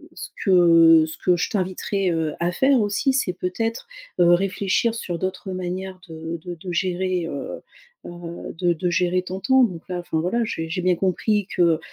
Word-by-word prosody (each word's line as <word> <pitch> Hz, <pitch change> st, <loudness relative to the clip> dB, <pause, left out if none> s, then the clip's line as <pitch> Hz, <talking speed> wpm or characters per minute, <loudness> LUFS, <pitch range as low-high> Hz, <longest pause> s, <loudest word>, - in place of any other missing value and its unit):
ce -, -, -7 dB
que 165 Hz, -4 st, +6 dB
ce 155 Hz, -, -8 dB
que 180 Hz, -1 st, +2 dB
je -, -, -1 dB
t'inviterai, 190 Hz, -1 st, -1 dB
heu, 160 Hz, -2 st, -1 dB
à 175 Hz, +1 st, +1 dB
faire 265 Hz, +6 st, +3 dB
aussi 210 Hz, +6 st, +1 dB
c'est 260 Hz, -8 st, +1 dB
peut-être, 225 Hz, +6 st, -3 dB, 0.3 s
heu, 175 Hz, -1 st, +5 dB
réfléchir 195 Hz, +4 st, +1 dB
sur 180 Hz, -6 st, -4 dB
d'autres 190 Hz, 0 st, -4 dB
manières 185 Hz, +1 st, -5 dB
de 160 Hz, +1 st, -6 dB
de 175 Hz, -1 st, -6 dB
de 175 Hz, +2 st, -7 dB
gérer, 185 Hz, 0 st, -1 dB
heu 140 Hz, -3 st, -6 dB, 0.5 s
heu, 175 Hz, 0 st, -8 dB
de 175 Hz, -1 st, +2 dB
de 175 Hz, +2 st, -2 dB
gérer 180 Hz, +1 st, +1 dB
ton 185 Hz, +1 st, -5 dB
temps. 260 Hz, +4 st, +4 dB
Donc 180 Hz, -8 st, -2 dB
là 180 Hz, -1 st, -3 dB
enfin 160 Hz, -2 st, -2 dB
voilà, 210 Hz, +8 st, 0 dB
j'ai 165 Hz, -6 st, -4 dB
j'ai 180 Hz, +2 st, -2 dB
bien 180 Hz, 0 st, +2 dB
compris 195 Hz, +3 st, 0 dB
que, -, -, +1 dB
heu 165 Hz, -2 st, +3 dB
180 Hz, 190 wpm, -23 LUFS, 170-190 Hz, 0.5 s, que